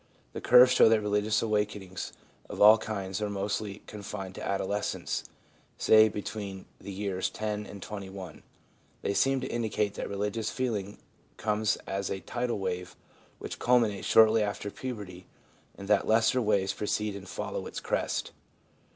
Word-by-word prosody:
The - - -5
curves 125 +1 +7
show 130 - +6
that 110 -1 +4
religious 105 +1 +1
awakenings 105 -4 -2 0.4
of - - -7
all 110 +2 +8
kinds 100 -2 -4
are 105 - -1
mostly 100 +1 -3
con 105 - -9
fined 95 -2 -6
to - - -8
adolescence 100 +1 -2 0.3
— - - -35
say, 110 0 +6
between 100 -2 -6
the 100 - -8
years 95 -1 -2
10 105 -1 -4
and 100 -2 -9
21. 95 -4 -8 0.6
They 100 - 0
seem 135 +7 +2
to - - -3
indicate 110 -3 -1
that - - -5
religious 105 +2 -2
feeling 105 -6 -3 0.4
comes 105 0 +1
as 95 0 -3
a 95 - -3
tidal 120 -1 -2
wave 90 -2 -4 0.4
which - - -7
culminates 115 -5 +2
shortly 110 0 +6
after 100 0 -2
puberty, 100 -9 -7 0.5
and 100 - -8
that 105 -1 +3
lesser 115 +3 +3
waves 100 -3 +1
precede 105 0 -2
and 95 -2 -9
follow - - -4
its - - -5
crest. - - -2
105 Hz, 155 wpm, -29 LUFS, 100-110 Hz, 0.6 s, all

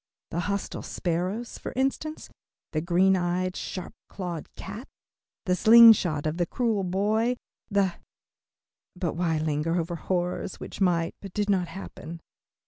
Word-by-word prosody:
The 170 - -1
hostile 200 +2 -2
sparrows, 185 +7 -3
for - - -6
instance, 275 +4 -1 0.4
the 155 - -1
green 180 +3 +4
eyed, 180 +1 0
sharp 185 +1 -5 0.2
clawed 175 -4 -5
cat, 210 +7 -8 0.6
the 180 - +2
sling 230 +3 +9
shot 155 -8 -2
of 155 +1 -1
the 175 -1 +1
cruel 225 -4 0
boy, 215 +6 +1 0.3
the 200 -3 +2 1.0
but 180 -3 -2
why 165 -2 0
linger 155 +1 0
over 170 +1 -3
horrors 180 +1 -2
which - - -8
might, 170 -3 +2
but 195 -3 -9
did 205 -1 +1
not 185 -3 +1
happen? 170 -3 -8
185 Hz, 140 wpm, -27 LUFS, 170-205 Hz, 1.0 s, sling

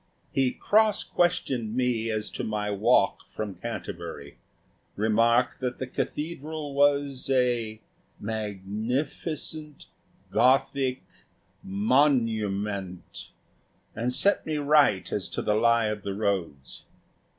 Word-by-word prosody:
He 135 -1 +2
cross 215 +5 +2
questioned 135 -11 0
me 125 -3 0
as 110 -1 -2
to - - -4
my 105 -1 -2
walk 100 - +2
from 105 -2 -5
Canterbury; 85 -4 -7 0.6
remarked 115 +3 +2
that 125 -1 -3
the 130 - -3
cathedral 150 +1 -4
was 140 -1 +2
a 120 -4 +1 0.4
magnificent 110 - -3 0.5
Gothic 130 +1 +2 0.6
Monument 105 - 0 0.7
and 120 +3 -1
set 200 +10 +3
me 155 -1 -2
right 145 -9 +3
as - - -2
to - - -3
the 105 - +2
lie 115 +1 +3
of 105 -1 -4
the 100 -1 -4
roads. 95 - -3
115 Hz, 105 wpm, -27 LUFS, 105-140 Hz, 0.7 s, set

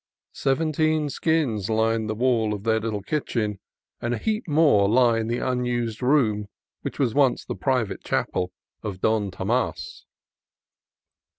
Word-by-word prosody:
Seventeen 155 +1 +1
skins 130 - 0
line 110 0 +1
the 110 - -2
walls 115 -3 +1
of 100 - -8
their 110 0 +2
little 110 -2 -3
kitchen, 110 -9 -2 0.4
and 120 +1 -1
a - - -4
heap 215 - -2
more 145 -11 +4
lie 120 0 +4
in 110 - -2
the 120 +1 -1
unused 125 -3 -1
room 120 -6 +2 0.3
which - - -5
once 125 -5 +1 0.3
was - - -17
the - - -4
private 125 -7 -1
chapel 90 0 -1 0.3
of 100 -4 -5
Don 110 -1 +1
Tomas. 120 - -2
115 Hz, 140 wpm, -24 LUFS, 110-135 Hz, 0.4 s, more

